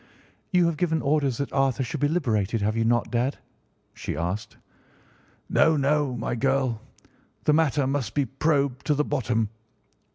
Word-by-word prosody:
"You 180 -2 +4
have 170 -2 0
given 160 -1 +1
orders 140 -4 +1
that 140 - -4
Arthur 135 -1 +1
should 135 +5 -4
be 145 - +3
liberated, 115 - 0
have 110 +2 0
you 115 - +1
not, 120 +1 +1
dad?" 125 +3 0 0.6
she - - -5
asked. 90 +6 -3 0.9
"No, 160 -1 +3
no, 140 -1 +1
my 115 - -3
girl, 130 -2 0 0.6
the 150 - +3
matter 150 -3 +2
must 135 -5 -2
be 145 -2 +2
probed 140 0 0
to 150 - +3
the 150 +1 +1
bottom." 120 -6 0
135 Hz, 160 wpm, -25 LUFS, 115-150 Hz, 0.9 s, You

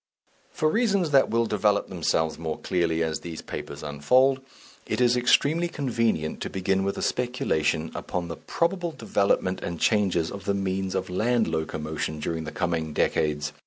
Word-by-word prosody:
For 155 - 0
reasons 200 -3 +2
that 135 -2 +5
will 115 +1 +2
develop 105 -1 +1
themselves 80 -3 0
more 80 -2 -3
clearly 85 -2 0
as 80 -1 -2
these 85 -2 -7
papers - - -7
unfold, 125 - +3 0.5
it - - -1
is 125 -1 +4
extremely 145 +7 +3
convenient 115 - -1
to - - -3
begin 95 0 0
with 100 0 -2
a - - -3
speculation 80 -11 0
upon 90 -2 -4
the 85 - -5
probable 170 0 -1
developments 100 -6 0
and 85 -1 -4
changes 95 -7 +2
of 100 - -8
the 100 - +1
means 95 -1 -2
of 95 -1 -2
land 115 +5 +2
locomotion 80 -1 -3
during 80 +1 -3
the 75 - -5
coming 80 -2 -2
decades. 75 0 0
95 Hz, 160 wpm, -26 LUFS, 80-120 Hz, 0.5 s, that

